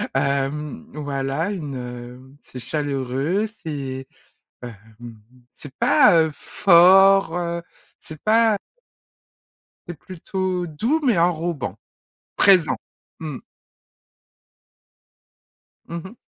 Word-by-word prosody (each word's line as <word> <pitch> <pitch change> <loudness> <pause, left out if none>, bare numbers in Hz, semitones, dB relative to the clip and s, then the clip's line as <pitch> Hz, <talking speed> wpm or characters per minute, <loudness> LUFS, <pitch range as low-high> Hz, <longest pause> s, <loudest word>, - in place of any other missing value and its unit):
hem, 140 +2 -2
voilà, 145 +4 -3
une, 150 -8 -5
heu, 125 +1 -9
c'est 125 - -11
chaleureux, 145 - -2 0.2
c'est, 135 -4 -5 0.6
hem, 120 -1 -7 0.8
c'est 140 -2 -12
pas, - - +5
heu, 160 - -1
fort, 195 0 +5
heu, 170 -1 -3 0.4
c'est 155 -1 -10
pas 220 0 +3 1.3
C'est 175 -5 -8
plutôt 185 +1 -4
doux, 230 - -1
mais 230 -9 +3
enrobant, 170 -4 -1 0.6
présent. 170 - +4 0.4
Mmh. 150 -5 -5 2.5
Mmh 170 - -6
mh. 200 +5 -10
160 Hz, 90 wpm, -22 LUFS, 135-185 Hz, 2.5 s, pas